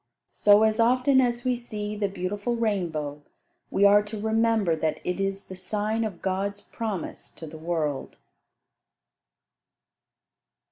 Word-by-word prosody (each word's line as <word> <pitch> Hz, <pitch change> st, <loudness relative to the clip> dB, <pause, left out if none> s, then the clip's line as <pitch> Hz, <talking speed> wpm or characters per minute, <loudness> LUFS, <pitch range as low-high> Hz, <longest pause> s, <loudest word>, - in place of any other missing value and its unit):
So 205 Hz, +1 st, +5 dB
as 220 Hz, +1 st, +2 dB
often 255 Hz, +3 st, +4 dB
as 240 Hz, -1 st, -1 dB
we 250 Hz, -1 st, +2 dB
see 210 Hz, -3 st, -5 dB
the 205 Hz, -1 st, 0 dB
beautiful 200 Hz, +5 st, -3 dB
rainbow, 170 Hz, -10 st, -2 dB, 0.5 s
we 200 Hz, -, +3 dB
are 205 Hz, +1 st, +7 dB
to 210 Hz, +1 st, -7 dB
remember 220 Hz, -4 st, +2 dB
that 155 Hz, -1 st, -1 dB
it 180 Hz, +2 st, -2 dB
is 195 Hz, 0 st, -2 dB
the 190 Hz, -, -9 dB
sign 210 Hz, +4 st, -2 dB
of 205 Hz, -6 st, -5 dB
God's 195 Hz, +2 st, -1 dB
promise 215 Hz, -7 st, -5 dB
to 160 Hz, -, -9 dB
the 160 Hz, 0 st, -10 dB
world. 155 Hz, -4 st, -2 dB
205 Hz, 135 wpm, -26 LUFS, 180-220 Hz, 0.5 s, are